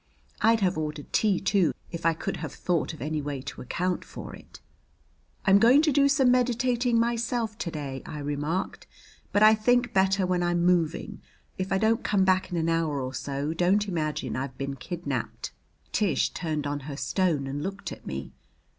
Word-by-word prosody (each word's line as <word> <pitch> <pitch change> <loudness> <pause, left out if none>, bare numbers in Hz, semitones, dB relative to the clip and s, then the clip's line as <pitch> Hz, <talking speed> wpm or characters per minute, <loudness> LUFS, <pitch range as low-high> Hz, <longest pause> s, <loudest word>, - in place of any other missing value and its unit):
I'd 225 0 +4
have 185 -4 +1
ordered 150 -1 -5
tea, 205 -4 +3
too, 195 -5 +2 0.2
if 170 -1 -1
I 165 - +3
could - - -4
have - - -5
thought 175 -3 0
of 160 - -8
any 155 0 -2
way 145 -1 -4
to - - -7
account 180 +8 -2
for - - -9
it. - - -15 0.9
"I'm 195 0 +6
going 250 +7 +6
to 310 - +3
do 280 0 +4
some 270 -2 +4
meditating 245 -1 +2
myself 235 -1 0
to 170 - -2
day," 140 -4 -5
I 150 - -7
remarked, 145 +5 -3 0.4
"but 205 - +4
I 215 0 +8
think 245 +2 +2
better 190 0 +3
when 180 -1 0
I'm 175 0 +1
moving. 170 -3 +1 0.4
If 190 +1 -3
I 195 - +3
don't 220 +3 +2
come 195 -2 +2
back 185 0 +2
in 175 - -3
an 165 0 0
hour 165 -3 0
or 130 0 -4
so 140 +3 -3
don't 185 +5 +2
imagine 155 -5 -2
I've 130 0 -4
been 140 0 -3
kidnaped." 175 +6 -4 0.4
Tish 190 -10 +1
turned 155 -4 -3
on 145 0 -2
her 140 - -5
stone 165 -5 0
and 140 +2 -4
looked 195 +4 -5
at - - -9
me. - - -5
180 Hz, 190 wpm, -27 LUFS, 150-215 Hz, 0.9 s, I